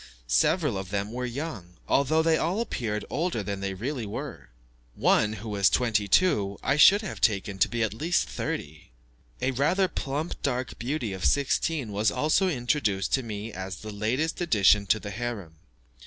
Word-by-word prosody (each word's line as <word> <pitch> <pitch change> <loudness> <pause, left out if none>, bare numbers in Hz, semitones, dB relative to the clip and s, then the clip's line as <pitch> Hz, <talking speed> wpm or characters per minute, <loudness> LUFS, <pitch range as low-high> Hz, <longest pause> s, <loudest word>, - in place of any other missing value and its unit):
Several 105 - +2
of 95 -1 -7
them 100 +1 -2
were 125 +1 -3
young, 120 - -6
although 155 +4 +2
they 165 0 +3
all 175 +6 0
appeared 110 - -3
older 160 - -1
than 100 -1 -4
they 95 0 -3
really 120 +2 -4
were. 100 - -7 0.5
One, 105 0 +3
who 110 +1 -7
was 100 -2 +3
twenty 110 -4 +1
two, 100 - +2
I 140 - +2
should 200 +8 +7
have 200 - -6
taken 100 -2 +1
to - - +4
be 120 -1 -1
at 110 - -1
least 160 - 0
thirty. 75 +5 -5 0.5
A 130 - +2
rather 155 +9 +2
plump 150 +1 -4
dark 125 -3 -2
beauty 120 -3 -2
of 95 -1 -7
sixteen 140 -2 +1
was 105 +1 +2
also 155 - +2
introduced 120 - 0
to 135 - +3
me 110 -2 -6
as 95 0 -5
the 105 +4 -8
latest 125 - -1
addition 105 - +4
to 110 - +3
the 100 - -7
harem. 105 -7 -5
115 Hz, 175 wpm, -27 LUFS, 100-150 Hz, 0.5 s, should